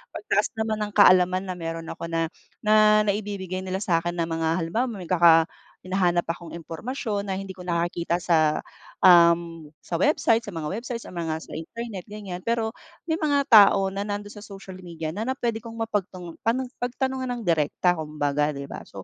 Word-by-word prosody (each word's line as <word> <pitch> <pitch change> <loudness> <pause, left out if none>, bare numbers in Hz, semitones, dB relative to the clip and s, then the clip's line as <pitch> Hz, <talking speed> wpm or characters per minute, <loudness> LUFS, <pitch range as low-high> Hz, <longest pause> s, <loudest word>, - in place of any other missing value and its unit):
pagtaas 420 - 0
naman 220 -1 -1
ng 210 -1 -3
kaalaman 185 -2 +5
na 185 -1 -4
meron 165 0 -5
ako 170 - -6
na, 165 0 -1 0.3
na 215 0 +5
naibibigay 200 -3 -2
nila 190 +1 -3
sa 175 -6 +2
'kin 175 +1 -4
na 170 - 0
mga 165 +1 -1
halimbawa 225 +10 -1
magkaka 170 -6 +4 0.4
may 185 - -11
hinahanap 175 -2 +2
akong 170 -1 -9
impormasyon 205 - -4
na 190 - -1
hindi 195 0 -6
ko 185 - -14
nakikita 170 -1 -1
sa, 160 -3 +2 0.4
um, 170 -3 +5 0.2
sa - - -3
website, 285 -6 +3
sa 205 -5 -9
mga 155 -1 -3
websites, 235 -1 -6
sa - - -11
mga 160 -2 -3
sa - - -14
internet 205 +3 -7
gan'yan. 205 -4 -7
Pero 225 +2 -1 0.3
may 320 0 -2
mga 285 -3 +2
tao 195 -2 +7
na 200 +2 -4
nandun 205 0 -4
sa 210 - -11
social 195 -2 -10
media 165 -3 -6
na 210 +7 -4
na 260 - 0
pwede 235 -3 -2
kong 230 0 -10
mapagtung 195 -6 -4
pano 235 +4 0 0.2
pagtanungan 260 +1 -2
ng 240 - -6
direkta 170 +1 +1
kumbaga, 150 -1 -1
'di 140 - -5
ba? 140 - -7
So, 95 - -10
185 Hz, 185 wpm, -25 LUFS, 170-215 Hz, 0.4 s, tao